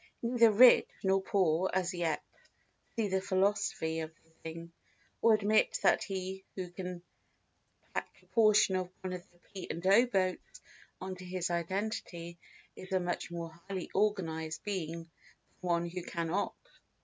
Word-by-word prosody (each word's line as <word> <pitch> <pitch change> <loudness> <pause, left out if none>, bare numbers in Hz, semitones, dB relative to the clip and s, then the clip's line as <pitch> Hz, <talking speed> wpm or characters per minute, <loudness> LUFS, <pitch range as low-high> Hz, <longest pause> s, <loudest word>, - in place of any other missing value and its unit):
Neither 235 -1 +5
rich 245 +4 +7
nor 190 0 +3
poor 185 -2 +2
as 185 0 0
yet 170 -3 -1 0.7
see 225 -2 +1
the 190 -1 0
philosophy 190 -4 +1
of 160 0 -4
the 160 - -29
thing, 165 +1 -7 0.5
or 230 -1 +6
admit 215 +1 +3
that - - +4
he 190 -1 -4
who 185 -2 -5
can 180 -1 -6 0.9
tack - - -2
a - - -24
portion 215 -3 +4
of 185 -1 -3
one 185 -1 -4
of 180 - -5
the 175 - -27
P. 190 +2 -10
& - - -11
O. 200 +6 +7
boats 185 -5 -1 0.4
on 190 0 -5
to 185 - -10
his 180 -1 -2
identity 170 -1 -3 0.4
is 185 - -10
a 190 - +3
much 175 -1 -3
more 170 -1 -5 0.2
highly 190 -3 -4
organised 165 -6 0
being 170 -5 -3
than 165 - -24 0.5
one 170 -1 0
who 180 +1 -5
cannot. 170 +2 -2
185 Hz, 155 wpm, -32 LUFS, 170-200 Hz, 0.9 s, rich